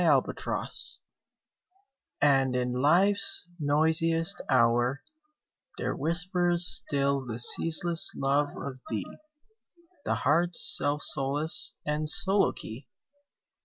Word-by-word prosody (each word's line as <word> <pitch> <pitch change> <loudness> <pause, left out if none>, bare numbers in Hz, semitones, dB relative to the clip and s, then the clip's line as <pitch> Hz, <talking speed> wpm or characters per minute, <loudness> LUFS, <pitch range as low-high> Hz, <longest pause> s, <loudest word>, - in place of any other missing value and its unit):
25 - - -2 1.5
And 135 -3 +1
in 125 0 -2
Life's 180 +13 0
noisiest 160 +2 0
hour 120 +1 0 0.7
There - - -4
whispers 175 +2 -1
still 140 -5 -1
the 115 -3 -8
ceaseless 165 +7 +5
love 140 +2 -1
of 130 -2 -8
thee, 105 -5 -5 1.0
The - - -2
heart's 170 +3 +1
self 145 0 -1
solace 145 +4 0
} - - -56
and 150 +1 -3
soliloquy. 190 - +1
150 Hz, 90 wpm, -26 LUFS, 135-170 Hz, 1.5 s, ceaseless